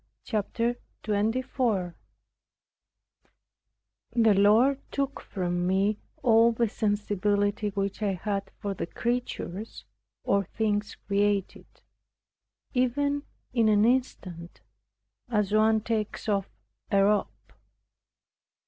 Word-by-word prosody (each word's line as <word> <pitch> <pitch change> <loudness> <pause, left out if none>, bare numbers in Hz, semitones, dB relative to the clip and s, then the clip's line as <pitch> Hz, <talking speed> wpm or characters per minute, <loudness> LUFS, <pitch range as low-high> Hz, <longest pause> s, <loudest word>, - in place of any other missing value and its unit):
CHAPTER 230 +2 -1 0.3
24 215 -3 0 2.2
The 225 -3 +5
Lord 220 +8 +4
took 275 0 -2
from 175 -1 -2
me 195 +3 +1 0.2
all 230 0 +6
the 235 0 +1
sensibility 205 -1 0
which 200 +1 -3
I 205 -2 +1
had 195 +2 -3
for 200 -1 -3
the 175 - -4
creatures, 230 -3 -4 0.4
or 200 0 +2
things 210 +1 -1
created, 200 -1 0 1.1
even 285 +3 +1 0.3
in 230 -3 +3
an 210 0 +4
instant, 185 -9 -2 0.7
as 210 -4 +1
one 220 +1 +4
takes 220 -1 -3
off 200 -2 0 0.4
a 195 -1 +4
robe. 205 0 +3
210 Hz, 95 wpm, -27 LUFS, 200-230 Hz, 2.2 s, all